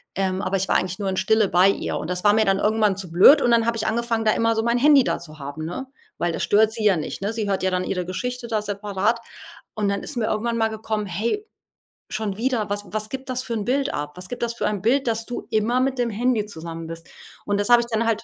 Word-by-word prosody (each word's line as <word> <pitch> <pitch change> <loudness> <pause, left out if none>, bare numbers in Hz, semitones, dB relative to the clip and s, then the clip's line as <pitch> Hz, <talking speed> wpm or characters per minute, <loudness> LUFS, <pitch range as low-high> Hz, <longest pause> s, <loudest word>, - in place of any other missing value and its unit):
ähm, 190 0 -1
aber 195 -1 0
ich 190 - -1
war - - +1
eigentlich 185 +1 -3
nur 200 - -2
in 190 - -2
Stille 220 +1 +3
bei 185 +2 +5
ihr. - - -2
Und 155 - -5
das 180 0 -1
war 205 - +6
mir 220 0 +4
dann 195 0 +2
irgendwann 210 -2 +2
zu 185 -3 -4
blöd 235 - +7
und 240 - +2
dann 230 -1 +4
habe 230 0 0
ich - - -2
angefangen, 230 0 -1
da 215 - +5
immer 230 0 +1
so 225 - 0
mein 235 +1 +2
Handy 285 0 +6
da - - -1
zu 155 -3 -11
haben, 140 +3 -6
ne, 220 +11 -5 0.3
weil 175 -1 0
das - - -2
stört 215 +1 +4
sie 225 -2 -3
ja 195 -5 +4
nicht, 155 - -5
ne, 205 +2 -1
sie 220 -2 -2
hört 190 -1 -1
ja 190 - +1
dann 180 0 0
ihre 180 -2 -2
Geschichte 245 +6 -4
da 220 -2 -1
separat 205 +2 -1 0.6
und 210 -2 -1
dann 200 0 -1
ist - - -3
mir 220 -2 0
irgendwann 230 +2 -1
mal 225 0 +2
gekommen: 220 -1 -3
„Hey, 230 - -2 0.6
schon 210 -3 -3
wieder 230 -4 -1
was 205 0 -2
was 215 0 -2
gibt 265 0 -7
das 255 0 -2
für 235 - -4
’n 215 -3 -2
Bild 270 +3 0
ab? 150 +2 -5
Was 180 0 -6
gibt 245 - -5
das 235 0 -2
für - - -1
ein 205 -3 -2
Bild, 250 +4 +2
dass 225 0 0
du 245 - -6
immer 225 +3 +1
mit 265 -1 -1
dem 240 -1 +1
Handy 225 0 0
zusammen 165 -3 -7
bist?" 165 0 -9 0.4
Und, 205 0 0
das 205 - -2
habe 240 0 +7
ich 235 - -5
dann 230 0 -1
halt 225 -1 0
215 Hz, 280 wpm, -23 LUFS, 190-235 Hz, 0.6 s, blöd